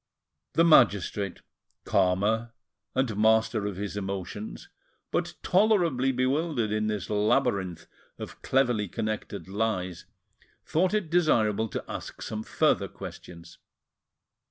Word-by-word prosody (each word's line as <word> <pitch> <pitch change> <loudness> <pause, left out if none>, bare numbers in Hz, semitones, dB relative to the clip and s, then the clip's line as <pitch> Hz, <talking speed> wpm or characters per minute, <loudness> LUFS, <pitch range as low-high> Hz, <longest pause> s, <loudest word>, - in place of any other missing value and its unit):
The 165 - +4
magistrate, 100 - +3 0.4
calmer, 105 +5 +1 0.4
and 130 -4 +1
master 110 0 +3
of 100 - -4
his 100 +1 -4
emotions, 100 +1 -5 0.4
but - - -1
tolerably 175 - +3
bewildered 130 -2 0
in 110 0 0
this 105 -4 -2
labyrinth 105 -5 0 0.3
of - - -9
cleverly 120 -6 +1
connected 110 -3 -4
lies, 95 -4 -2 0.6
thought 185 +5 +1
it 190 -7 -2
desirable 115 - +2
to - - -5
ask - - -7
some 110 0 -4
further - - +1
questions. 85 -1 -11
110 Hz, 110 wpm, -27 LUFS, 100-130 Hz, 0.6 s, The